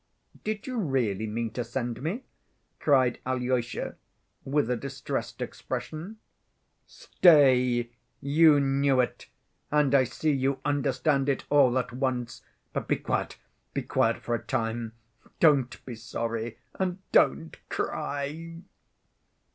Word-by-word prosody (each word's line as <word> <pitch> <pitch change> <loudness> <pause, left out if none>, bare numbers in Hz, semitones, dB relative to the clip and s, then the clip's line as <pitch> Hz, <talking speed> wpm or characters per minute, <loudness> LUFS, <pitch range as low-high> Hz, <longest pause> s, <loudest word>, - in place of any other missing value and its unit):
"Did 215 -1 -3
you 255 -2 -4
really 120 - 0
mean 115 +1 -3
to 120 +2 -3
send 120 0 -4
me?" 185 - -3 0.6
cried 130 -4 +3
Alyosha 125 -2 -2 0.5
with 145 -1 +1
a - - +2
distressed 135 +1 -4
expression. 175 +8 -6 0.7
"Stay! 130 - +4 0.3
You 150 +1 +5
knew 135 -1 +2
it! 125 - -1 0.4
And 150 -2 +2
I 135 -2 +5
see 155 +5 -1
you 135 -1 0
understand 140 0 +1
it 140 - -1
all 135 -4 +5
at 125 -2 -2
once. 125 -2 -2 0.3
But - - -3
be - - +2
quiet, - - -2 0.4
be - - -1
quiet - - +1
for 120 - -2
a 115 - -1
time. 115 0 -2 0.5
Don't 140 -6 +3
be 125 - -6
sorry, 115 0 -4 0.2
and 185 -1 0
don't 75 +4 +3
cry." 155 +4 -3
135 Hz, 125 wpm, -28 LUFS, 120-145 Hz, 0.7 s, You